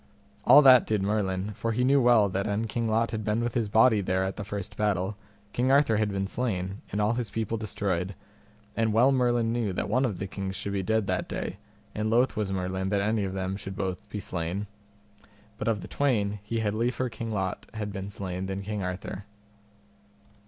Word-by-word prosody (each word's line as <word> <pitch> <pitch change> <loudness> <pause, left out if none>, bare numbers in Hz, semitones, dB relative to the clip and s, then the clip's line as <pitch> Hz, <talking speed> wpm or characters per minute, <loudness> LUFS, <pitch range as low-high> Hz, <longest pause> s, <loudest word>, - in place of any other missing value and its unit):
All 145 +4 +9
that 130 -3 +8
did 105 -3 +1
Merlin, 100 -1 -1
for 115 +2 -2
he 125 +3 +1
knew 135 +2 +4
well 120 -4 +5
that 95 +1 -2
an 105 +2 0
King 115 +1 -2
Lot 115 +1 +1
had 110 -1 -3
been 110 +2 0
with 120 -1 -1
his 115 -4 0
body 110 0 +5
there 95 0 0
at 95 0 -2
the 105 - -5
first 100 -1 -6
battle, 100 -1 0 0.4
King 125 +2 +2
Arthur 135 -6 +4
had 105 -1 +1
been 95 0 -1
slain, 95 -4 -3
and 100 - -2
all 105 +2 +2
his 120 -3 -2
people 110 +1 -2
destroyed; 100 -4 -2 0.6
and 110 -1 +1
well 125 +5 +5
Merlin 120 -3 +2
knew 115 -5 -1
that 90 - -2
one 125 +6 +2
of 110 -8 -1
the 95 - -3
kings 95 0 -5
should 100 +2 -4
be 100 - 0
dead 110 +2 +1
that 95 -1 -1
day, 95 - -4 0.4
and 105 +1 -1
loath 120 +3 +3
was 105 -2 -1
Merlin 95 0 -2
that 100 0 +1
any 105 0 +1
of 95 - -4
them 95 -1 -2
both 95 - -6 0.4
should - - -31
be 105 - -4
slain; 90 +2 -3 0.9
but 105 - -3
of 110 -3 +1
the - - -8
twain, 105 -7 0
he 110 +2 -2
had 105 -2 0
liefer 125 +3 0
King 115 -1 -6
Lot 95 -3 -2
had 105 -2 -4
been 100 0 -5
slain 95 -2 -4
than 95 +1 -4
King 105 0 -3
Arthur. 95 +2 -5
105 Hz, 215 wpm, -28 LUFS, 95-115 Hz, 0.9 s, All